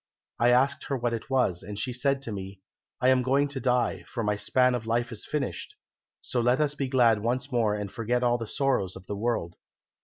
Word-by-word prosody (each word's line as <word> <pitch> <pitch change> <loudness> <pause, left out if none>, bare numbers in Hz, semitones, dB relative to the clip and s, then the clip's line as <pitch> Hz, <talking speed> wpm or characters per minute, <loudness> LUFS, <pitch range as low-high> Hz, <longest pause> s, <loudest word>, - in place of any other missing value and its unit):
I 120 - +4
asked 130 +3 +3
her 135 - -1
what 120 -1 -1
it 115 - -5
was, 125 -10 +1
and 105 +1 -7
she 125 +4 -2
said 135 +2 0
to 115 - -5
me, 95 -1 -7 0.4
'I 125 - +4
am 130 -1 +4
going 135 +3 +2
to 140 -1 -5
die, 120 -7 +1
for 115 - -4
my 105 0 +1
span 125 +5 +2
of 115 -2 -3
life 120 +1 0
is 110 - -7
finished; 150 - -3 0.5
so 125 - -1
let 125 +3 +3
us 150 -1 +1
be 140 -2 -2
glad 120 -4 +4
once 125 +5 -1
more 115 -4 +2
and 105 -2 -4
forget 125 +1 -1
all 120 0 +2
the 115 - -5
sorrows 130 -9 0
of 95 - -11
the 105 - -4
world.' 105 -6 -2
120 Hz, 225 wpm, -27 LUFS, 105-130 Hz, 0.5 s, I